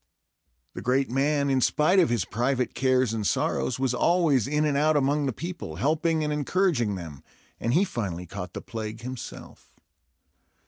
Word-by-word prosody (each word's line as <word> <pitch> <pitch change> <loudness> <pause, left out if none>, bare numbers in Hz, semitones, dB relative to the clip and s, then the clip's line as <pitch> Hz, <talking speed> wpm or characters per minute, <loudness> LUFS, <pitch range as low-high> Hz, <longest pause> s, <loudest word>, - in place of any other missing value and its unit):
The - - -6
great 125 +4 +1
man, 140 +1 +1
in 130 -1 +2
spite 155 +9 +3
of 175 - +4
his 115 -6 0
private 125 +2 -1
cares 130 -3 +2
and 110 - -2
sorrows, 125 - 0
was 130 -1 0
always 155 - +2
in 150 +2 +1
and 145 -2 +1
out 150 +2 +3
among 145 +1 +1
the - - 0
people, 170 - -6
helping 155 - +1
and 150 0 -1
encouraging 150 - +1
them, 80 -7 -8 0.4
and 120 +3 0
he 180 - +5
finally 95 - -4
caught 90 0 -7
the - - -6
plague 110 0 -6
himself. 125 0 -9
130 Hz, 170 wpm, -26 LUFS, 115-150 Hz, 0.4 s, he